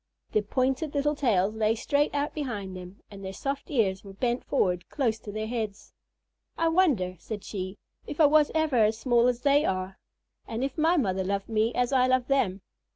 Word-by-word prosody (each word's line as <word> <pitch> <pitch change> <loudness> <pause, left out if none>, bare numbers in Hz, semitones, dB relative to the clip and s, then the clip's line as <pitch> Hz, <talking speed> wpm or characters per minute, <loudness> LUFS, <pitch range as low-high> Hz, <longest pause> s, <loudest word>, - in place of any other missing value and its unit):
Their 215 - +2
pointed 265 +7 -1
little 290 +1 +2
tails 215 -8 +1
lay 220 0 +1
straight 285 +6 +1
out 285 +1 -1
behind 210 -11 -4
them, 180 +1 -10
and 195 -1 -10
their 190 0 -5
soft 275 +7 -4
ears 200 -9 +1
were 195 -1 -11
bent 240 +4 -1
forward 180 -9 0
close 230 -6 0
to 215 - -8
their 215 +1 -3
heads. 220 -3 -5 0.6
"I 330 0 +2
wonder," 270 - +2
said 210 +2 -6
she, 190 -1 -5 0.3
"if 295 - -7
I 315 - +7
was 300 0 +5
ever 315 -5 +2
as 220 +1 0
small 240 0 +3
as 245 -1 0
they 285 +1 +4
are, 185 -2 -2 0.5
and 230 +2 -3
if 270 -1 -2
my 330 +2 +3
mother 190 - 0
loved 200 +2 -2
me 220 +1 +1
as 250 +2 +1
I 255 -1 +4
love 255 -1 +2
them." 205 -9 +1
230 Hz, 200 wpm, -27 LUFS, 200-280 Hz, 0.6 s, I